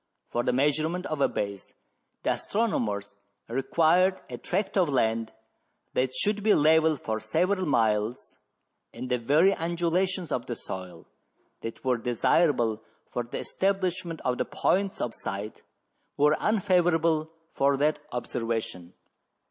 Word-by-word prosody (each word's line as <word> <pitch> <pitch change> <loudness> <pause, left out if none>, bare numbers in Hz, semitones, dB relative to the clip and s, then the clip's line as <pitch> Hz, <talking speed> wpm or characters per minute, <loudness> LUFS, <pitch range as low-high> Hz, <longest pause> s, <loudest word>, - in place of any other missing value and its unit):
For 120 - 0
the 125 - +1
measurement 155 +7 +1
of 155 -2 -3
a - - +5
base 100 -2 -5 0.5
the - - +2
astronomers 105 - -1 0.3
required 165 +9 +2
a - - -6
tract 195 +2 -2
of 180 -5 +3
land 115 -4 +1 0.6
that 130 0 +1
should 205 +11 0
be 210 0 +4
level 160 +1 +4
for 110 -5 -3
several 185 - 0
miles, 110 -3 0 0.6
and 130 - -7
the 125 - +2
very 155 +11 +4
undulations 175 +1 -1
of 120 - -2
the 120 - -3
soil 90 -5 -8 0.6
that 115 +3 -7
were 125 -2 +2
desirable 120 -1 +2 0.3
for 120 - -1
the 120 0 -6
establishment 185 -4 -1
of 125 0 0
the - - +1
points 195 +1 0
of 120 - -2
sight 100 +2 -5 0.6
were 150 +1 +4
unfavourable 170 -6 +2 0.2
for 140 0 +2
that 150 +2 +1
observation. 115 -7 -3
145 Hz, 130 wpm, -27 LUFS, 115-175 Hz, 0.6 s, a